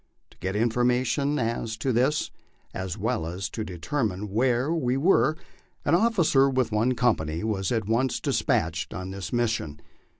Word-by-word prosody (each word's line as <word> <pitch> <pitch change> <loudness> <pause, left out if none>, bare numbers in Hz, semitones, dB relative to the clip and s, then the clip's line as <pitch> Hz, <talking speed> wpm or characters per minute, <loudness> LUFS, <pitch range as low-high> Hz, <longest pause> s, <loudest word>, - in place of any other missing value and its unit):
To - - -21
get 95 +3 -3
information 125 +5 +1
as 115 -2 -2
to 130 - -1
this, 130 +6 +1 0.4
as 95 -2 -4
well 80 - -1
as 90 +4 -4
to 110 - -4
determine 100 - -3
where 125 +6 +1
we 130 -6 0
were, 155 0 +3 0.5
an 145 - +2
officer 170 -9 +4
with 130 -4 0
one 115 +4 +2
company 85 -10 0
was 100 -4 -1
at 115 -4 0
once 120 +3 +1
despatched 80 -3 0
on 95 0 -5
this 95 -3 -6
mission. 110 -11 -1
115 Hz, 155 wpm, -26 LUFS, 95-130 Hz, 0.5 s, officer